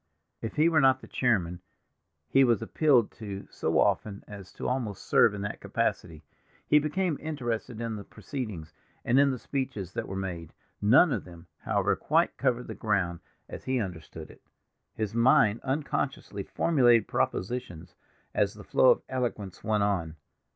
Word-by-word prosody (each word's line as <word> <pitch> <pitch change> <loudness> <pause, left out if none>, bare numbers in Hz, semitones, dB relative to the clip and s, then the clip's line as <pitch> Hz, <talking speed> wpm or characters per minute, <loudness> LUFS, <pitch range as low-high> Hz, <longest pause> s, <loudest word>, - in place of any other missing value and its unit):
If 115 - -5
he 155 +2 +4
were 160 -2 +4
not 130 -1 +4
the - - -12
chairman, 90 -8 0 0.7
he 135 +11 +4
was 120 -3 +2
appealed 130 -2 +3
to 100 -2 -6
so - - -1
often 100 -2 +1
as 100 -3 -10
to - - -5
almost 120 -6 -2
serve 105 - +4
in 100 - -5
that 105 - -5
capacity. 80 -3 -2 0.4
He 150 - +5
became 155 +2 -1
interested 120 -6 -4
in 115 -2 -3
the 100 - -7
proceedings, 105 - -7 0.3
and 125 +3 +4
in 140 0 +5
the 130 - -2
speeches 130 -7 -4
that - - -4
were 95 - -5
made; 90 -4 -5 0.3
none 130 +10 +5
of - - -2
them, 85 -1 -13
however, - - +1
quite - - +1
covered 125 -2 0
the - - -6
ground 90 -6 -1 0.3
as - - -9
he 130 -1 0
understood 90 -7 -7
it. - - -19 0.5
His 110 -1 -3
mind 115 -2 +4
unconsciously 135 -6 -2
formulated 120 - +3
propositions 90 -6 -3 0.4
as - - +1
the - - -11
flow - - +4
of - - +3
eloquence 115 -7 -4
went 105 -1 +1
on. 90 -6 -1
110 Hz, 165 wpm, -28 LUFS, 95-130 Hz, 0.7 s, He